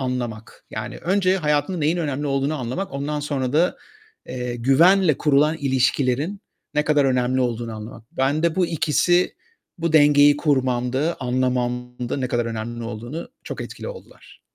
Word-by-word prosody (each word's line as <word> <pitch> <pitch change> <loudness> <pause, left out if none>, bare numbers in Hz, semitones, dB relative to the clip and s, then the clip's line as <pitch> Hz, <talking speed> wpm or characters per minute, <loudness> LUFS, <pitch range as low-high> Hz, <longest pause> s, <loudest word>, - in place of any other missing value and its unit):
anlamak, 120 -4 -4
yani, 120 +2 -5
önce 185 +1 +2
hayatında 150 +1 0
neyin 155 +2 +1
önemli 145 -4 -2
olduğunu 140 +2 0
anlamak, 130 +10 -4
ondan 145 +2 -3
sonra 135 -3 -2
da, 165 +4 +2 0.5
eee, 125 -1 -4
güvenle 155 +7 +4
kurulan 150 +2 +3
ilişkilerin 135 +6 0 0.3
ne 150 0 +2
kadar 150 -2 +3
önemli 130 -1 +1
olduğunu 120 -2 -2
anlamak. 110 +1 -9
Ben 140 +4 0
de 170 -1 +1
bu 185 -2 +3
ikisi 170 +2 +2 0.4
bu 165 -1 -1
dengeyi 145 -1 +6
kurmamda, 130 +1 0
anlamamda 125 -1 -1
ne 130 -2 -2
kadar 120 -1 0
önemli 115 +1 -5
olduğunu 120 +8 -6 0.2
çok - - -6
etkili - - -7
oldular. - - -13
135 Hz, 145 wpm, -22 LUFS, 125-155 Hz, 0.5 s, dengeyi